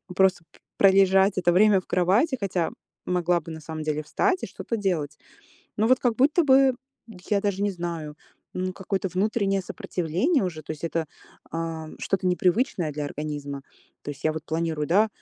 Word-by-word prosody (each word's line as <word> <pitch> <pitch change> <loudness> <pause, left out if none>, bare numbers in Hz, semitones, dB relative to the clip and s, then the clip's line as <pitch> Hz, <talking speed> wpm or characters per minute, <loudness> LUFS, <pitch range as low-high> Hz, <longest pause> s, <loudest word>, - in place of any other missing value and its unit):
просто 190 -2 +3
п - - -22 0.2
пролежать 195 0 +5
это 175 -1 +3
время 200 +1 +5
в - - -30
кровати, 205 - +2
хотя 185 -4 -1 0.3
могла 175 -1 +1
бы, 165 - -9
на 160 0 -8
самом 155 +1 -6
деле, 155 0 -2
встать 375 - 0
и - - -2
что-то 230 - -4
делать. 165 -8 -1 0.6
Ну 215 - +2
вот 255 0 +5
как 245 -3 +1
будто 300 +7 +3
бы- 270 -1 +5 0.6
я 205 -1 +3
даже 200 -1 -1
не 205 - +2
знаю, 170 -4 -5 0.4
м- 185 0 -2
какое-то 190 0 -2
внутреннее 195 0 +1
сопротивление 185 - -1
уже. 165 -4 -4
То 155 - -11
есть 155 +1 -8
это, 165 -1 -1 0.4
ам, 165 -1 -5
что-то 190 -1 -1
непривычное 180 - +1
для 150 0 -4
организма. 145 -1 -5 0.4
То - - -5
есть 145 - -15
я 155 - +3
вот 155 -1 -6
планирую, 160 -2 -2
да, 210 +6 +4
180 Hz, 175 wpm, -25 LUFS, 160-200 Hz, 0.6 s, пролежать